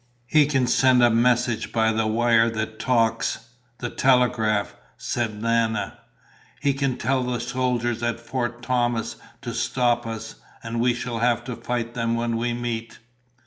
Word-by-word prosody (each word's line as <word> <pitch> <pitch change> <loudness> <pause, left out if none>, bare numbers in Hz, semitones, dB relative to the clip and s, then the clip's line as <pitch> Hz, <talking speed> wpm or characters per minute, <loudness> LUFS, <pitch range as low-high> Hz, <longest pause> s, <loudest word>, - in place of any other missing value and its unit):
"He 145 +3 +4
can 135 -4 +2
send 125 0 +4
a 120 - +6
message 120 0 +2
by 110 -1 +2
the 110 0 0
wire 115 +1 +3
that 110 -1 -4
talks, 115 -1 0 0.3
the 120 - -4
telegraph," 120 -5 +2 0.2
said 110 -3 -3
Nana. 115 -2 0 0.6
"He 140 -1 +1
can 135 -2 -1
tell 130 +2 0
the 125 -1 -2
soldiers 120 -1 -1
at 120 0 -1
Fort 120 0 -4
Thomas 120 -2 0 0.3
to - - -4
stop 120 -2 0
us, 110 0 -6 0.3
and 115 0 -2
we 120 0 +2
shall 120 -1 -4
have 120 0 +2
to 125 -1 -5
fight 120 -1 -3
them 115 -1 -1
when 115 0 -1
we 120 +1 -1
meet." 120 -1 -4
120 Hz, 155 wpm, -24 LUFS, 115-125 Hz, 0.6 s, a